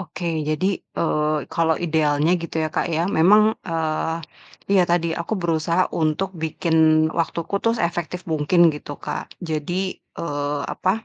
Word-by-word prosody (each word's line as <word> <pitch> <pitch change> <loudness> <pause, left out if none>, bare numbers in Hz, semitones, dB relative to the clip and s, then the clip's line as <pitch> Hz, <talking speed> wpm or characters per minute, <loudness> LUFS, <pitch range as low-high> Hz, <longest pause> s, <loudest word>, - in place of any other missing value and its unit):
Oke, 170 -3 -3
jadi, 185 +5 0
eee, 150 -2 -1
kalo 165 -1 +2
idealnya 155 -1 +1
gitu 170 -1 -6
ya - - -1
Kak - - 0
ya, 165 0 0
memang, 210 +6 +6
eee, 160 -1 -2 0.6
iya 190 -2 +6
tadi, 170 -1 +1
aku 170 +6 -3
berusaha 170 0 0
untuk 165 +4 0
bikin 160 0 -1 0.4
waktuku 170 +3 -2
tuh 230 +1 +1
seefektif 175 0 -2
mungkin 160 +1 +3
gitu 145 -1 -7
Kak, 150 - -6
jadi, 175 +4 -2
eee, 145 -2 -4
apa, 205 +5 -1
165 Hz, 140 wpm, -22 LUFS, 155-180 Hz, 0.6 s, memang